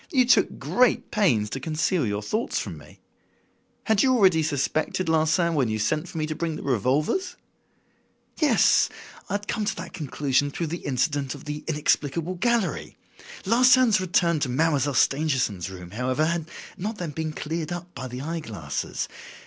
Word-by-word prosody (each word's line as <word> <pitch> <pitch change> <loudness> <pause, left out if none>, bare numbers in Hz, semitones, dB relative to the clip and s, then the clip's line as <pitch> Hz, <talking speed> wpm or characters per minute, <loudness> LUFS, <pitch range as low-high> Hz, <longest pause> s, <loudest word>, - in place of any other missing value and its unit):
You 255 -4 +3
took 245 - +3
great 250 0 +1
pains 140 - +2
to 135 - -3
conceal 155 - 0
your 105 0 -2
thoughts 215 - -2
from - - -3
me. - - -15 0.8
Had 220 -3 +2
you 260 -1 +4
already 185 -8 +4
suspected 155 +4 -1
Larsan 160 +2 +2
when 140 -6 +2
you 110 - -1
sent 150 +10 -1
for - - -8
me 155 - 0
to 155 - -3
bring 165 0 -3
the - - -7
revolvers?" 140 - 0 1.0
"Yes! 305 -3 +4 0.4
I - - -3
had 205 +1 -4
come 215 - -1
to 210 - -1
that - - -8
conclusion 145 -1 0
through 160 +2 -4
the 170 - -5
incident 140 +1 0
of 140 - -12
the 150 0 -5
'inexplicable 155 +2 0
gallery.' 230 +2 -1 0.5
Larsan's 240 -1 +5
return 170 -3 +2
to 135 - -1
Mademoiselle 145 0 +1
Stangerson's 130 - +1
room, 90 -2 -10
however, 130 +7 0
had 165 0 -2 0.3
not 210 +4 -4
then 175 -5 -4
been 155 +1 -3
cleared 160 +2 -4
up 175 0 -6
by 130 - -6
the 125 +1 -6
eye 165 +4 -3
glasses. 95 - -4
155 Hz, 170 wpm, -25 LUFS, 135-185 Hz, 1.0 s, Larsan's